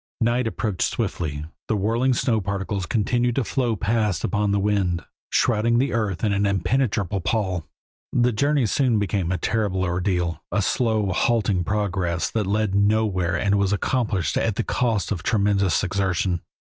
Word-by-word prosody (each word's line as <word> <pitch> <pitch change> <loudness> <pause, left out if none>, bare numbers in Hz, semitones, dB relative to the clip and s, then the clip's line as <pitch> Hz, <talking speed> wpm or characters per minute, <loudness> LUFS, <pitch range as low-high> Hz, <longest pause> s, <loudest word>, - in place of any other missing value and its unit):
Night 120 +1 +1
approached 110 -4 -3
swiftly, 80 -9 -3 0.2
the 110 - +1
whirling 115 +6 +1
snow 115 -3 +1
particles 100 0 -3
continued 120 +2 +1
to 135 - +1
flow 120 -1 0
past 105 -4 0
upon 105 -1 0
the 100 - +2
wind, 95 -5 0 0.3
shrouding 115 0 +2
the 135 +3 +1
earth 105 -5 -1
in 105 -2 +2
an 100 +1 +1
impenetrable 100 0 0
pall. 95 -6 -1 0.4
The 125 0 +2
journey 140 +3 +2
soon 120 +2 +2
became 100 -3 -1
a 95 - 0
terrible 100 -4 0
ordeal, 90 -3 -1
a 100 - +1
slow, 110 -4 +1
halting 100 -3 +1
progress 90 -4 -1
that 110 -4 -1
led 105 0 0
nowhere 100 -3 +2
and 100 0 +1
was 100 -1 +1
accomplished 105 - 0
at 110 -3 0
the 115 - -1
cost 115 -6 0
of 95 -5 -2
tremendous 100 -2 +1
exertion. 95 -2 0
100 Hz, 155 wpm, -23 LUFS, 95-115 Hz, 0.4 s, the